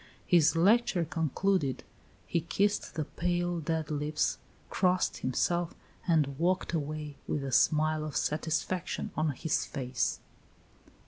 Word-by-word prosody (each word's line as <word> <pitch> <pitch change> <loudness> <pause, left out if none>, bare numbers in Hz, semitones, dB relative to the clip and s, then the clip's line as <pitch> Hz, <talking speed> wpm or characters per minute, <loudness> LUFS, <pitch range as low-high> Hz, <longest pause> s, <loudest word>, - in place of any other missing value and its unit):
His 165 -2 +4
lecture 195 0 +3
concluded, 160 -1 0 0.4
he 170 - 0
kissed 200 +5 0
the 155 -2 -1
pale, 175 +2 -1
dead 160 -1 -2
lips, 150 +1 0 0.3
crossed 185 -1 +1
himself, 170 +7 0 0.3
and 150 -5 +2
walked 180 +1 +1
away 150 -2 -3
with 145 - -1
a 135 - -3
smile 155 +3 +3
of 155 -2 -3
satisfaction 160 +4 -1
on 155 0 +1
his 160 +4 0
face. 130 -4 -2
160 Hz, 120 wpm, -30 LUFS, 150-175 Hz, 0.4 s, His